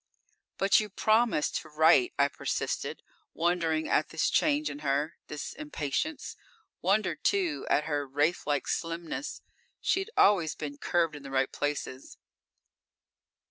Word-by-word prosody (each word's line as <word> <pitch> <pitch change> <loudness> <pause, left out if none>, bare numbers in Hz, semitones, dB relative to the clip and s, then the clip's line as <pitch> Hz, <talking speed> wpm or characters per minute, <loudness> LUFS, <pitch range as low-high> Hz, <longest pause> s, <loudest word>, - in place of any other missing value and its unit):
"But 195 +1 +4
you 215 -1 -3
promised 215 -4 +2
to 155 - -14
write," 160 - +5
I - - +4
persisted, - - -3 0.3
wondering 165 -2 +1
at - - +2
this - - 0
change 300 0 +2
in 145 - -5
her, 145 +2 0
this 150 - -6
impatience. 300 - -3 0.5
Wondered, 200 +4 +1
too, 365 -6 0
at 150 - +3
her 145 -2 -2
wraithlike 145 +1 0
slimness. 170 - -4 0.4
She'd 385 +2 0
always 175 -7 +4
been 145 -1 -6
curved 165 -3 +1
in 145 - -9
the 140 - -9
right 135 -1 +1
places. 145 -2 -4
165 Hz, 130 wpm, -29 LUFS, 145-215 Hz, 0.5 s, write